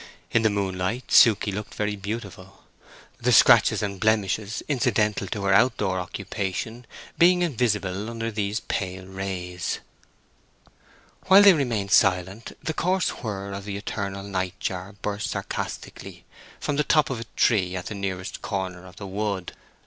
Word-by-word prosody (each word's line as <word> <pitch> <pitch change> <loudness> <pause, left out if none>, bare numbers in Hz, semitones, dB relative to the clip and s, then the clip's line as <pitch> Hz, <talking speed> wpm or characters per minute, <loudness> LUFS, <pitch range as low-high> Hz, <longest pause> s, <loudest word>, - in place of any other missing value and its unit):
In 115 - +3
the 110 - +3
moonlight 100 +3 -2
Suke 110 -4 +6
looked 105 0 -4
very 105 0 -1
beautiful, 100 -2 -7 0.6
the - - +1
scratches - - +6
and 100 -2 -3
blemishes 110 0 0
incidental 110 -7 +1
to 100 +1 -4
her 100 0 +3
out 115 +5 +4
door 95 -2 -1
occupation 100 +6 -4 0.3
being 180 +1 +5
invisible 105 - -1
under 115 0 -4
these 105 0 -2
pale 95 -3 -4
rays. 95 -2 -4 1.5
While 195 +2 +8
they 200 -2 +9
remain 120 - -1
silent 95 +3 +2
the 160 - -2
coarse 185 +3 0
whir 100 -4 -4
of 100 0 -6
the 100 -1 -4
eternal 100 -1 -4
night 95 -2 -3
jar 95 +2 -4
burst 105 0 -2
sarcastically - - -6 0.3
from 145 - -2
the 150 - +3
top 155 -2 +3
of 125 - -3
a 115 - -6
tree 95 -6 +2
at 90 - -4
the - - -5
nearest 95 -2 -4
corner 95 -2 -4
of 90 - -14
the 100 - -8
wood. 100 -1 -3
100 Hz, 150 wpm, -25 LUFS, 95-115 Hz, 1.5 s, they